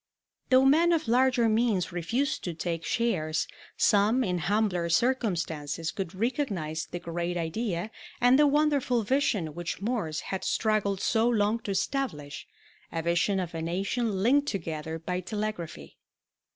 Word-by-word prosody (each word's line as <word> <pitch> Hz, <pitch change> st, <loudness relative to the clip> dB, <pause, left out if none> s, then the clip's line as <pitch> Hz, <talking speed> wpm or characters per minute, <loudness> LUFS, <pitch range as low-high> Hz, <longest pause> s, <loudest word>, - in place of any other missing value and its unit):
Though 260 Hz, +1 st, +6 dB
men 330 Hz, +5 st, +5 dB
of 320 Hz, -6 st, 0 dB
larger 245 Hz, 0 st, +3 dB
means 215 Hz, -5 st, +1 dB
refused 230 Hz, -, -1 dB
to 175 Hz, -3 st, -3 dB
take 165 Hz, 0 st, -3 dB
shares, 165 Hz, -11 st, 0 dB, 0.3 s
some 215 Hz, +5 st, +3 dB
in 180 Hz, -5 st, -1 dB
humbler 180 Hz, -1 st, 0 dB
circumstances 165 Hz, -, 0 dB
could 190 Hz, -3 st, -5 dB
recognize 195 Hz, -, -2 dB
the -, -, -5 dB
great 170 Hz, +1 st, -3 dB
idea 175 Hz, +3 st, -2 dB, 0.3 s
and 250 Hz, +2 st, +5 dB
the 295 Hz, -, +6 dB
wonderful 285 Hz, -5 st, +2 dB
vision 210 Hz, -, 0 dB
which 175 Hz, +1 st, -4 dB
Morse 200 Hz, -8 st, -2 dB
had 190 Hz, -, -4 dB
struggled 205 Hz, -3 st, 0 dB
so 225 Hz, +1 st, +2 dB
long 215 Hz, -1 st, +2 dB
to 220 Hz, -, -8 dB
establish 190 Hz, -, -2 dB, 0.4 s
a 165 Hz, -1 st, -3 dB
vision 175 Hz, +4 st, +1 dB
of 175 Hz, -2 st, -4 dB
a 165 Hz, -, -4 dB
nation 195 Hz, +4 st, -1 dB
linked 285 Hz, +5 st, +3 dB
together 160 Hz, -, -3 dB
by 180 Hz, +3 st, -3 dB
telegraphy. 185 Hz, -, -5 dB
200 Hz, 140 wpm, -28 LUFS, 170-240 Hz, 0.4 s, Though